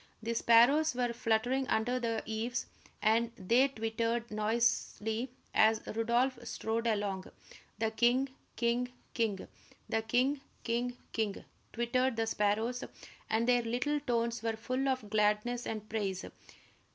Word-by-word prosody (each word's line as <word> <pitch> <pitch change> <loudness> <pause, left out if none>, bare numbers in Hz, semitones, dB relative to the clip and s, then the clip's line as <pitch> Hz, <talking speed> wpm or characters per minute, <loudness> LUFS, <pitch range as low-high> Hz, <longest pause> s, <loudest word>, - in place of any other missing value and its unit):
The 230 +1 -1
sparrows 245 +7 +5
were 245 -1 0
fluttering 240 +4 +1
under 245 +3 +1
the 230 -2 -1
eaves, 225 +3 -2 0.4
and 230 +2 +3
they 235 +8 +3
twittered 230 -1 -2
noisily 225 +1 0 0.2
as 220 0 +5
Rodolph 240 +3 +1
strode 230 0 -2
along, 205 -4 -1 0.5
"The 220 +1 0
king, 245 +4 +3 0.3
king, 240 +1 0 0.2
king!" 215 -5 -1 0.4
"The 225 - 0
king, 255 +5 +1 0.2
king, 245 +1 -1 0.2
king," 215 -3 -2 0.3
twittered 255 +2 +1
the 225 0 0
sparrows, 220 +4 0 0.5
and 225 +2 +1
their 245 -1 +4
little 250 +6 0
tones 235 -4 -1
were 225 -1 -1
full 255 +4 -1
of 255 -5 -1
gladness 210 +3 +1
and 215 -1 -4
praise. 200 -4 -2
230 Hz, 125 wpm, -32 LUFS, 220-245 Hz, 0.5 s, sparrows